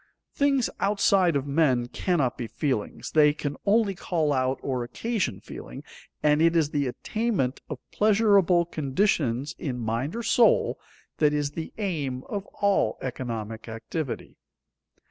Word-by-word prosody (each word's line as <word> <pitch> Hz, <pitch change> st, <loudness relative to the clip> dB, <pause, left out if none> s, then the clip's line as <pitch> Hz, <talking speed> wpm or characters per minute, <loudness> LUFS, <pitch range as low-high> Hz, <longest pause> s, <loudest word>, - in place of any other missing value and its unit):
Things 275 Hz, -3 st, +2 dB
outside 195 Hz, -4 st, +3 dB
of 140 Hz, -1 st, 0 dB
men 140 Hz, -4 st, +2 dB
cannot 140 Hz, -3 st, 0 dB
be 120 Hz, -, -5 dB
feelings, 115 Hz, -1 st, -3 dB
they 150 Hz, -1 st, +5 dB
can 145 Hz, -1 st, -3 dB
only 210 Hz, -1 st, +3 dB
call 160 Hz, -5 st, 0 dB
out 130 Hz, 0 st, +1 dB
or 130 Hz, -3 st, -1 dB
occasion 220 Hz, -, -2 dB
feeling, -, -, -9 dB, 0.4 s
and 150 Hz, +1 st, +4 dB
it 165 Hz, +1 st, +4 dB
is 155 Hz, -3 st, +2 dB
the 145 Hz, -2 st, 0 dB
attainment 190 Hz, -, -2 dB
of -, -, -4 dB
pleasurable 200 Hz, -5 st, +4 dB
conditions 145 Hz, -, 0 dB
in 130 Hz, -5 st, -3 dB
mind 120 Hz, -, -2 dB
or 235 Hz, -, -3 dB
soul 230 Hz, +1 st, +3 dB, 0.4 s
that 150 Hz, -1 st, +4 dB
is 145 Hz, -1 st, 0 dB
the 160 Hz, +1 st, -6 dB
aim 145 Hz, -11 st, -2 dB
of 200 Hz, -1 st, -4 dB, 0.2 s
all 200 Hz, -1 st, +2 dB
economic 115 Hz, -3 st, -5 dB
activity. 125 Hz, +5 st, -5 dB
150 Hz, 140 wpm, -26 LUFS, 130-195 Hz, 0.4 s, they